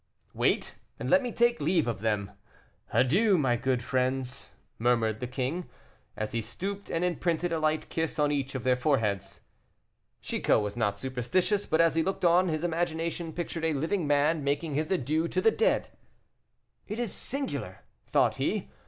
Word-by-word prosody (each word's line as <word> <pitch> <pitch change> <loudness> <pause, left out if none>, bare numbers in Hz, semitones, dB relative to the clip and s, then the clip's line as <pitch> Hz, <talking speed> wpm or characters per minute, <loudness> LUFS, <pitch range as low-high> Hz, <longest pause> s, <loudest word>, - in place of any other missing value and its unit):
"Wait, - - 0 0.2
and - - -3
let 275 - +6
me 245 -2 -3
take 235 -6 +2
leave 160 -1 +2
of 115 -4 -2
them. 105 -3 -1 0.6
Adieu, 190 - +4
my 130 -6 +2
good 125 0 0
friends," 130 0 -1 0.2
murmured 115 -2 +2
the 125 - -3
king, 135 +8 -3 0.5
as 110 0 -3
he 115 - -1
stooped 195 - -5
and 165 +2 0
imprinted 175 0 0
a 165 - 0
light 155 0 0
kiss 160 0 -2
on 150 -1 +2
each 140 -2 -2
of 130 - -3
their 130 0 +3
foreheads. 115 - 0 0.8
Chicot - - +1
was 105 0 -4
not 105 -4 0
superstitious, 135 - 0
but 160 - +1
as 165 0 +5
he 165 - +2
looked 190 +1 -1
on, 175 +2 +5
his 155 -1 -1
imagination 170 0 -1
pictured 165 -1 -4
a 160 -1 +2
living 160 +4 -1
man 145 +2 +2
making 145 +2 -1
his 155 +4 -1
adieux 160 -1 +1
to 185 - -1
the 220 +4 +4
dead. 460 - +1 1.0
"It 215 - -4
is 240 -4 -2
singular," 275 +1 -3 0.3
thought - - +2
he. - - -1
155 Hz, 170 wpm, -29 LUFS, 125-175 Hz, 1.0 s, let